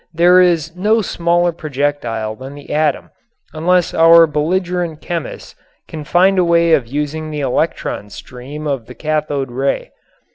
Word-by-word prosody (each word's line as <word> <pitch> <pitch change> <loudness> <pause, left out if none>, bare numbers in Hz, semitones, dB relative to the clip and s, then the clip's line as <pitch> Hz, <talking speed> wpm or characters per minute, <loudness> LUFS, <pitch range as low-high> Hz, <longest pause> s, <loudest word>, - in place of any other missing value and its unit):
There 180 +2 +5
is 170 -2 +1
no 215 +4 +1
smaller 175 -1 +1
projectile 140 -8 -3
than 130 +4 -10
the 145 0 -8
atom 150 -2 0 0.4
unless 175 +2 +1
our 165 0 +7
belligerent 170 +2 -2
chemists 170 -5 -6 0.3
can 155 -2 -8
find 185 +4 +3
a - - +4
way 170 -1 +3
of 125 -6 +2
using 150 +4 -4
the 150 -1 -4
electron 130 -5 -2
stream 130 +8 -9
of 135 -6 -3
the - - -11
cathode 150 -4 -2
ray. 135 +3 -2
155 Hz, 145 wpm, -17 LUFS, 145-170 Hz, 0.4 s, our